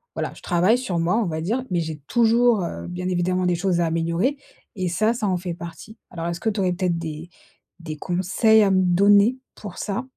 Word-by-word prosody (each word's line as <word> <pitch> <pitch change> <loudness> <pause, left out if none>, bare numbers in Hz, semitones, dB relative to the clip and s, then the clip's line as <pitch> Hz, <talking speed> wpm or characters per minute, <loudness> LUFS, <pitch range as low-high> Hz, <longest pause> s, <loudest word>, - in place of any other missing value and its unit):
voilà, - - -3
je - - -15
travaille 180 +7 +3
sur 190 -9 -3
moi, 175 +6 +1
on 230 - +1
va 160 -1 -3
dire, 235 +9 -1
mais 175 - +1
j'ai 160 -2 -5
toujours, 235 -3 +3
heu, 170 - -5
bien 180 +1 -5
évidemment 180 +1 0
des 175 - +2
choses 175 -1 0
à - - +2
améliorer 170 - 0 0.4
et 185 -2 -2
ça, 215 +6 +1
ça 220 -3 -2
en 185 -1 +1
fait 175 -1 -5
partie. 170 +6 -10
Alors 170 -1 -5
est-ce 170 0 -3
que 220 - +1
tu 205 -1 -3
aurais 180 -1 +1
peut-être 180 -2 -1
des 160 +1 -6 0.5
des 160 -2 -6
conseils 190 +6 +2
à 195 - +2
me 185 0 +3
donner 200 +6 +4 0.2
pour 205 -4 -9
ça? 205 +5 -3
180 Hz, 225 wpm, -23 LUFS, 170-215 Hz, 0.5 s, donner